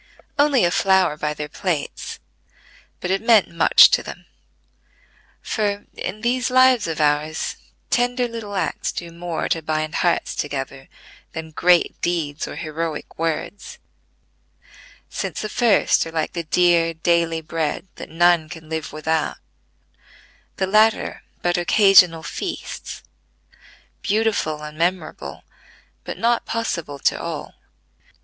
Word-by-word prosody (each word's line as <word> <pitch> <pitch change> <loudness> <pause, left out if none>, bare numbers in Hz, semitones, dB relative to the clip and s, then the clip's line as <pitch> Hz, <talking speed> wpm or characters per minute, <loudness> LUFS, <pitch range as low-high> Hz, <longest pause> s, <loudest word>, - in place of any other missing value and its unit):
Only 285 -7 +4
a 175 - +2
flower 190 -4 +3
by 150 0 -3
their 150 0 -5
plates; 160 -1 -3 0.8
but 180 - -2
it 195 - +1
meant 225 -3 +4
much 170 - +7
to - - +3
them: - - -10 1.2
for, 205 -2 -2
in 210 +3 -5
these 245 +1 0
lives 255 -4 +5
of 160 -1 -3
ours, 150 +1 0 0.4
tender 245 0 +1
little 225 -3 -7
acts 190 - -1
do 170 -1 -6
more 170 -1 -4
to 165 - 0
bind 155 0 -2
hearts 175 -1 +1
together 135 -2 -5 0.4
than 160 -1 -6
great, 175 +2 +2
deeds 160 -4 -2
or - - -7
heroic 160 -1 -5
words; 165 +5 -3 1.3
since - - -4
the 215 - -3
first 230 -3 +3
are - - -8
like 160 -1 -2
the 170 -1 -4
dear 170 0 +3
daily 165 0 +1
bread 160 +2 -3
that - - -8
none 170 -1 +3
can 160 -1 -10
live 160 -1 -4
without; 155 +1 -1 1.2
the 190 - +1
latter 215 +3 +2 0.2
but 175 0 +1
occasional 180 -3 +5
feasts, - - -6 1.0
beautiful 205 -8 0
and 150 +1 -9
memorable, 175 -1 -2 0.6
but - - -6
not 235 +1 +1
possible 170 -11 -3
to - - 0
all. - - -5
170 Hz, 130 wpm, -22 LUFS, 155-205 Hz, 1.3 s, much